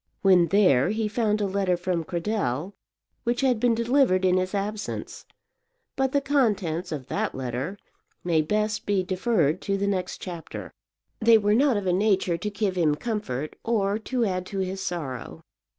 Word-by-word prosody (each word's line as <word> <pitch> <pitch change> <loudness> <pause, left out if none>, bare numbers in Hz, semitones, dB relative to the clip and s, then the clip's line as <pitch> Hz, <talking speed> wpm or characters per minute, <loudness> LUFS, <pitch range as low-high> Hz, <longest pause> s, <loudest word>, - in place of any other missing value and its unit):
When 185 -3 +5
there 180 -8 +4
he 220 +1 0
found 215 -1 0
a - - +2
letter 195 -2 0
from 175 -1 -1
Cradell, 175 - -2 0.5
which 240 +2 0
had 255 -4 +2
been 240 0 +3
delivered 235 -5 +3
in 185 0 +4
his 185 +2 -1
absence; 205 +1 -4 0.7
but 265 -1 +1
the 280 - +2
contents 200 - 0
of 145 -5 -4
that - - -2
letter 130 +8 -4 0.5
may 165 -3 +2
best 210 +6 -1
be 200 -2 +2
deferred 185 - +1
to 195 0 -1
the 200 - -1
next 185 -2 -2
chapter. 175 -3 -7 0.5
They 225 0 +6
were 205 -1 +2
not 260 0 +3
of 200 - -3
a 180 - +2
nature 190 -2 +2
to 180 +5 -3
give 205 -2 -1
him 155 -4 +3
comfort 155 - -4
or 210 -2 +1
to 240 +1 -1
add 185 -2 -2
to 200 - -6
his 190 0 -2
sorrow. 150 -10 -5
195 Hz, 170 wpm, -25 LUFS, 175-215 Hz, 0.7 s, They